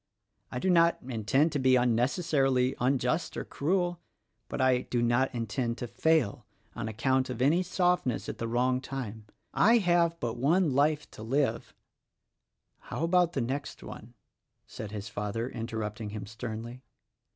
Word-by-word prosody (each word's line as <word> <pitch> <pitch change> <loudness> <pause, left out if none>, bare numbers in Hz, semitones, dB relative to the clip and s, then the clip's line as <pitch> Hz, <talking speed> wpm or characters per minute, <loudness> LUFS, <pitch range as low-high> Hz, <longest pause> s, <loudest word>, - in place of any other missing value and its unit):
I - - -4
do 185 +9 +1
not 170 -1 +4
intend 130 +6 +1
to 145 - -1
be 130 -1 +4
unnecessarily 130 +2 +2
unjust 130 +5 0
or - - -3
cruel, 175 +3 -1 0.5
but - - -4
I 130 -1 +4
do 125 - -2
not 120 +3 +2
intend 115 +1 -2
to 125 - -4
fail 125 -5 +1 0.3
on 115 -1 -4
account 130 +4 0
of 125 -2 -5
any 150 +8 +3
softness 180 - 0
at - - -6
the 115 - -2
wrong 125 +2 +1
time. 115 -6 -6 0.3
I 230 +3 +5
have 175 -4 +2
but 120 -1 -3
one 155 +4 +2
life 145 +2 +2
to - - -11
live, 120 0 -1 0.4
— - - -56
" - - -51
"How - - -3
about 175 0 +3
the 135 - -1
next 135 +4 -4
one?" 120 +3 -10 0.5
said 110 - -7
his 105 0 -6
father, 110 +2 -3
interrupting 110 -3 -4
him 105 -1 -6
sternly. 115 +2 -7
130 Hz, 160 wpm, -29 LUFS, 115-155 Hz, 0.5 s, I